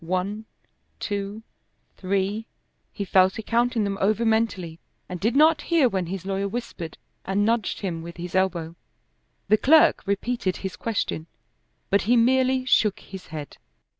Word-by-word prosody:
One, 185 Hz, +5 st, -2 dB, 0.5 s
two, 205 Hz, +1 st, -4 dB, 0.5 s
three 200 Hz, +3 st, -1 dB, 0.4 s
he 200 Hz, -, -4 dB
fell 185 Hz, 0 st, +5 dB
to 220 Hz, +3 st, -8 dB
counting 235 Hz, 0 st, +1 dB
them 200 Hz, -1 st, -2 dB
over 215 Hz, +4 st, +2 dB
mentally 210 Hz, -7 st, 0 dB, 0.3 s
and 180 Hz, -1 st, -6 dB
did 225 Hz, +7 st, 0 dB
not 310 Hz, +1 st, +5 dB
hear 330 Hz, -6 st, +3 dB
when 190 Hz, -6 st, -2 dB
his 190 Hz, +1 st, -5 dB
lawyer 195 Hz, 0 st, -1 dB
whispered 200 Hz, -7 st, -6 dB, 0.3 s
and 195 Hz, +2 st, 0 dB
nudged 225 Hz, -2 st, 0 dB
him 175 Hz, -5 st, -3 dB
with 170 Hz, +1 st, -9 dB
his 175 Hz, 0 st, -6 dB
elbow. 175 Hz, -3 st, 0 dB, 0.7 s
The 215 Hz, -, +5 dB
clerk 310 Hz, +7 st, +5 dB
repeated 200 Hz, -1 st, -1 dB
his 190 Hz, -1 st, -5 dB
question, 195 Hz, -7 st, -3 dB, 0.6 s
but 200 Hz, -, +4 dB
he 240 Hz, +4 st, +3 dB
merely 260 Hz, +2 st, +3 dB
shook 215 Hz, -5 st, +3 dB
his 190 Hz, -1 st, -11 dB
head. 155 Hz, -3 st, -8 dB
200 Hz, 150 wpm, -24 LUFS, 185-230 Hz, 0.7 s, fell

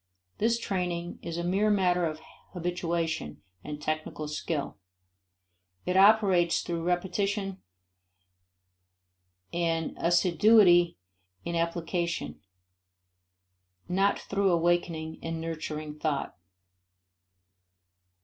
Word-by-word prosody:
This 230 Hz, +2 st, +2 dB
training 180 Hz, -5 st, -3 dB
is 170 Hz, 0 st, -5 dB
a 170 Hz, -, -2 dB
mere 195 Hz, +5 st, +2 dB
matter 180 Hz, -4 st, +2 dB
of 155 Hz, 0 st, -6 dB, 0.3 s
habituation 170 Hz, -, -2 dB, 0.2 s
and 150 Hz, 0 st, -6 dB
technical 155 Hz, 0 st, -3 dB
skill; 150 Hz, -1 st, -3 dB, 1.1 s
it 180 Hz, -, -1 dB
operates 195 Hz, -4 st, +5 dB
through 170 Hz, -1 st, -3 dB
repetition 195 Hz, +3 st, -1 dB, 1.9 s
and 165 Hz, -2 st, -1 dB
assiduity 175 Hz, -, +5 dB, 0.5 s
in 170 Hz, -, -2 dB
application, 170 Hz, -, -2 dB, 1.5 s
not 195 Hz, +3 st, +2 dB
through 200 Hz, 0 st, 0 dB
awakening 170 Hz, -2 st, 0 dB
and 165 Hz, 0 st, -4 dB
nurturing 155 Hz, -2 st, -5 dB
thought. 150 Hz, -3 st, -2 dB
175 Hz, 80 wpm, -28 LUFS, 165-185 Hz, 1.9 s, operates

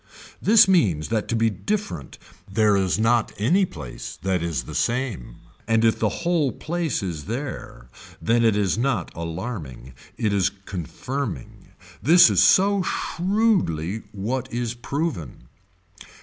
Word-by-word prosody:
This 215 Hz, -1 st, +6 dB
means 100 Hz, -, +2 dB
that 110 Hz, -2 st, -1 dB
to 115 Hz, -, -1 dB
be 115 Hz, 0 st, +2 dB
different 200 Hz, -, -4 dB, 0.3 s
there 105 Hz, 0 st, +3 dB
is 95 Hz, -1 st, +1 dB
not 115 Hz, +1 st, +2 dB
any 175 Hz, -, +3 dB
place 75 Hz, -, -8 dB
that 95 Hz, -2 st, 0 dB
is 85 Hz, -5 st, -2 dB
the -, -, -9 dB
same 115 Hz, -, -2 dB, 0.3 s
and 115 Hz, 0 st, +3 dB
if 110 Hz, -, +2 dB
the 110 Hz, -, +2 dB, 0.2 s
whole 165 Hz, -6 st, +2 dB
place 165 Hz, -8 st, -3 dB
is 80 Hz, -6 st, -4 dB
there 120 Hz, -, -6 dB, 0.3 s
then 115 Hz, +1 st, +2 dB
it 110 Hz, -3 st, +4 dB
is 105 Hz, +1 st, +1 dB
not 120 Hz, -, -1 dB
alarming 80 Hz, -, -6 dB, 0.2 s
it 105 Hz, -2 st, 0 dB
is 100 Hz, -1 st, +2 dB
confirming. 95 Hz, -, -6 dB, 0.3 s
This 170 Hz, +4 st, +7 dB
is -, -, +4 dB
so 200 Hz, +1 st, +5 dB
shrewdly 175 Hz, -, 0 dB
what 120 Hz, +6 st, -3 dB
is 120 Hz, -1 st, -2 dB
proven. 120 Hz, -, -4 dB
115 Hz, 135 wpm, -23 LUFS, 90-140 Hz, 0.3 s, This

